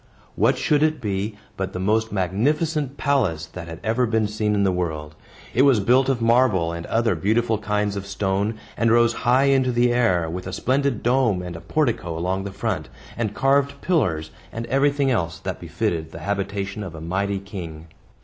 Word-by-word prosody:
What -, -, +3 dB
should 150 Hz, -1 st, +2 dB
it 155 Hz, 0 st, +2 dB
be 105 Hz, -1 st, -2 dB, 0.2 s
but 95 Hz, 0 st, -4 dB
the 90 Hz, -, -4 dB
most 110 Hz, +4 st, +1 dB
magnificent 140 Hz, -, 0 dB
palace 130 Hz, -, +1 dB
that 85 Hz, +1 st, -9 dB
had 80 Hz, -1 st, -8 dB
ever 115 Hz, +4 st, +1 dB
been 110 Hz, -1 st, +1 dB
seen 105 Hz, 0 st, -1 dB
in 100 Hz, -, +2 dB
the 95 Hz, -, +3 dB
world. 80 Hz, -4 st, -3 dB, 0.4 s
It 125 Hz, -, +3 dB
was 135 Hz, -5 st, +5 dB
built 125 Hz, +6 st, +3 dB
of 120 Hz, -4 st, 0 dB
marble 115 Hz, -8 st, +3 dB
and 85 Hz, 0 st, -6 dB
other 115 Hz, -2 st, +2 dB
beautiful 110 Hz, +6 st, +1 dB
kinds 105 Hz, -1 st, -1 dB
of 100 Hz, 0 st, -5 dB
stone, 100 Hz, +2 st, -1 dB, 0.2 s
and 115 Hz, -, +2 dB
rose 120 Hz, 0 st, +4 dB
high 125 Hz, +3 st, +2 dB
into 135 Hz, -2 st, +3 dB
the 120 Hz, 0 st, +3 dB
air, 95 Hz, -9 st, +2 dB
with 90 Hz, +3 st, -5 dB
a 95 Hz, -, -5 dB
splendid 130 Hz, +2 st, 0 dB
dome 120 Hz, -7 st, +2 dB
and 90 Hz, -1 st, -6 dB
a 80 Hz, -, -8 dB
portico 110 Hz, -, -1 dB
along 95 Hz, +3 st, -1 dB
the 100 Hz, -, -4 dB
front, 95 Hz, -6 st, -3 dB, 0.3 s
and 110 Hz, -3 st, -2 dB
carved 140 Hz, +1 st, +2 dB
pillars, 90 Hz, -, 0 dB, 0.2 s
and 115 Hz, +1 st, -5 dB
everything 140 Hz, +1 st, +2 dB
else 85 Hz, -9 st, -1 dB
that -, -, -5 dB
befitted 80 Hz, -2 st, -2 dB
the -, -, -8 dB
habitation 100 Hz, 0 st, -3 dB
of 90 Hz, -5 st, -6 dB
a -, -, -7 dB
mighty 100 Hz, +5 st, -1 dB
king. 90 Hz, -5 st, -8 dB
105 Hz, 190 wpm, -23 LUFS, 95-125 Hz, 0.4 s, was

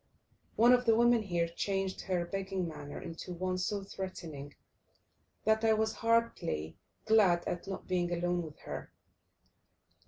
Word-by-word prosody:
One 240 Hz, +3 st, +7 dB
of 250 Hz, 0 st, +3 dB
the 225 Hz, -1 st, +5 dB
women 235 Hz, 0 st, +5 dB
here 175 Hz, -5 st, 0 dB
changed 195 Hz, +2 st, -2 dB
her 180 Hz, -2 st, -1 dB
begging 190 Hz, -1 st, -2 dB
manner 150 Hz, -3 st, -7 dB
into 170 Hz, +2 st, -7 dB
one 185 Hz, +1 st, -1 dB
so 200 Hz, +2 st, -1 dB
threatening, 165 Hz, -7 st, -7 dB, 0.9 s
that 220 Hz, +1 st, +3 dB
I 220 Hz, -1 st, +5 dB
was 220 Hz, 0 st, +1 dB
heartily 230 Hz, -, 0 dB, 0.3 s
glad 205 Hz, -6 st, +4 dB
at 175 Hz, +2 st, -3 dB
not 195 Hz, -, -5 dB
being 175 Hz, -1 st, 0 dB
alone 175 Hz, 0 st, 0 dB
with 155 Hz, -3 st, -8 dB
her. -, -, -7 dB
185 Hz, 145 wpm, -32 LUFS, 170-220 Hz, 0.9 s, One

